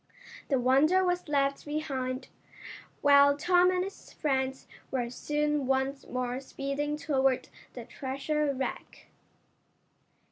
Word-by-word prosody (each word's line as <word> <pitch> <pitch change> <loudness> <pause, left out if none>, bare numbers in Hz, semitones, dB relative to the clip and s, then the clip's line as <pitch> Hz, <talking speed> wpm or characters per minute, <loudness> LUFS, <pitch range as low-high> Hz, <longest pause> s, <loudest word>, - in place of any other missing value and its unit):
The 270 -3 +2
Wonder 295 +9 +4
was 355 -1 -1
left 280 -1 +1
behind, 275 -4 -3 0.7
while 285 0 +6
Tom 355 +3 +4
and 365 0 +1
his 390 +1 -9
friends 265 -2 -1 0.2
were 245 -3 -2
soon 295 +1 -1
once 270 +1 -1
more 250 0 -2
speeding 275 +2 -3
toward 270 -4 +1 0.2
the 240 -2 -8
treasure 280 +4 -2
wreck. 265 -1 -6
275 Hz, 110 wpm, -29 LUFS, 265-300 Hz, 0.7 s, while